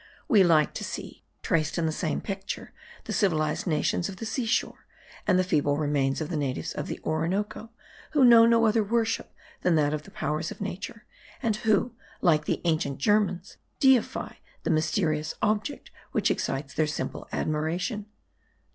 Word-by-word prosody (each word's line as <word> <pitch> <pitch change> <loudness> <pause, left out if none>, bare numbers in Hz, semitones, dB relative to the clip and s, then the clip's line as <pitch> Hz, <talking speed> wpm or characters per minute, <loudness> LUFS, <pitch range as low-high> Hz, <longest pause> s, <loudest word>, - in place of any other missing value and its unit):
We 205 -4 +6
like 160 -4 +4
to - - -5
see, - - -7 0.2
traced 155 0 0
in 170 - +1
the 160 - +1
same 155 0 -2
picture, 195 -1 -5 0.3
the - - -5
civilized 155 -6 +1
nations 170 +3 0
of 195 - -7
the 225 - -5
sea 225 +2 -2
shore, - - -1 0.4
and 185 -3 +4
the 185 - +3
feeble 145 -5 +1
remains 145 -2 0
of 155 - -3
the 170 - -2
natives 130 - -2
of - - -4
the - - -5
Orinoco, 185 +8 -1 0.4
who 285 -4 +5
know 230 -1 +8
no 230 0 +4
other 220 0 +3
worship 225 +1 0 0.3
than 180 -2 +3
that 150 -1 +2
of 150 - -2
the - - -14
powers 155 +2 -2
of - - -9
nature; 205 +4 -6 0.4
and 220 -3 +1
who, 220 +2 +1 0.3
like 155 -4 +3
the - - -1
ancient 155 -5 0
Germans, 195 +1 +1 0.2
deify 265 -4 +2 0.3
the - - 0
mysterious 155 -1 0
object 215 +7 -1 0.2
which - - +2
excites 140 +1 -2
their 155 0 +1
simple 150 - -4
admiration. 175 +8 -2
175 Hz, 170 wpm, -27 LUFS, 155-215 Hz, 0.4 s, know